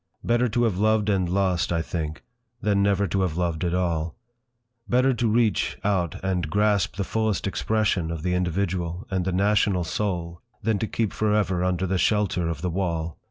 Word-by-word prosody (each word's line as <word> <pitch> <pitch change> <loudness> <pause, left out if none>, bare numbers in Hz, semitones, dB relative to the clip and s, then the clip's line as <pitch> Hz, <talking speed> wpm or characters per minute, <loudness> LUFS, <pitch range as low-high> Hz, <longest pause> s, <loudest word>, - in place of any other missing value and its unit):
Better 120 +1 +2
to 120 +3 +1
have 105 -6 +1
loved 110 0 +2
and 95 -4 +1
lost, 95 -2 +1
I 85 -1 +1
think, 80 -2 -4 0.4
than 100 -2 +1
never 100 0 +2
to 95 +2 0
have 90 -3 -1
loved 85 -2 -1
at 90 0 0
all; 85 -3 -1 0.7
better 130 +2 +3
to 120 -1 0
reach 110 0 +1
out 95 -5 0
and 90 -5 -1
grasp 100 -2 +2
the 100 - -1
fullest 110 -2 -1
expression 100 -2 0
of 80 -2 -4
the 90 - 0
individual 90 +1 -1
and 95 -2 0
the 95 - 0
national 100 -1 +2
soul, 85 -2 -3 0.2
than 110 -3 +1
to 110 - -1
keep 110 -2 -1
for 105 -1 +1
ever 95 -4 +1
under 90 0 0
the 95 0 0
shelter 95 -6 +1
of 80 0 -5
the 90 - 0
wall. 85 -3 -2
95 Hz, 190 wpm, -25 LUFS, 85-105 Hz, 0.7 s, better